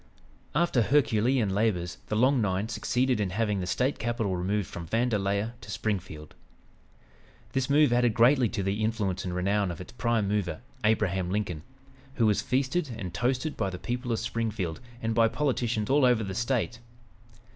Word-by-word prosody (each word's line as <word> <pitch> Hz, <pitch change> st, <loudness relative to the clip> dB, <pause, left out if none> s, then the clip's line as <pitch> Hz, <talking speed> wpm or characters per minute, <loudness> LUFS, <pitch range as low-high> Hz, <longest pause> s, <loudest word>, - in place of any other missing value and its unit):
After 165 Hz, -6 st, +3 dB
Herculean 120 Hz, -3 st, +2 dB
labors 95 Hz, -5 st, 0 dB
"the 105 Hz, -, -2 dB
Long 130 Hz, +3 st, +3 dB
Nine" 100 Hz, +1 st, 0 dB
succeeded 125 Hz, -1 st, 0 dB
in 100 Hz, -3 st, 0 dB
having 105 Hz, +1 st, 0 dB
the 90 Hz, -, -3 dB
State 125 Hz, +8 st, 0 dB
capital 110 Hz, -4 st, -1 dB
removed 95 Hz, +2 st, -1 dB
from 85 Hz, -1 st, -7 dB
Vandalia 105 Hz, 0 st, 0 dB
to 115 Hz, -, -12 dB
Springfield. 95 Hz, -8 st, -4 dB, 1.2 s
This 135 Hz, -1 st, -1 dB
move 145 Hz, -3 st, +5 dB
added 120 Hz, -2 st, +3 dB
greatly 125 Hz, 0 st, +5 dB
to 100 Hz, -, -3 dB
the 100 Hz, +3 st, -1 dB
influence 105 Hz, -4 st, -1 dB
and 90 Hz, -1 st, -3 dB
renown 100 Hz, +2 st, +1 dB
of 85 Hz, -, -6 dB
its 90 Hz, -, -9 dB
"prime 115 Hz, -4 st, 0 dB
mover," 105 Hz, -1 st, -1 dB, 0.2 s
Abraham 95 Hz, -4 st, +1 dB
Lincoln, 95 Hz, -5 st, -2 dB, 0.5 s
who 115 Hz, -, +2 dB
was 105 Hz, -2 st, +3 dB
feasted 135 Hz, +5 st, 0 dB
and 90 Hz, -6 st, -6 dB
"toasted" 130 Hz, -, -1 dB
by 95 Hz, -, -1 dB
the 90 Hz, -, -6 dB
people 125 Hz, +5 st, -3 dB
of 115 Hz, -, +1 dB
Springfield 105 Hz, -9 st, -2 dB, 0.2 s
and 115 Hz, 0 st, 0 dB
by 115 Hz, 0 st, +4 dB
politicians 120 Hz, -5 st, -1 dB
all 140 Hz, +1 st, +3 dB
over 120 Hz, -3 st, +4 dB
the 95 Hz, -2 st, -4 dB
State. 115 Hz, +1 st, -1 dB
110 Hz, 170 wpm, -28 LUFS, 95-125 Hz, 1.2 s, move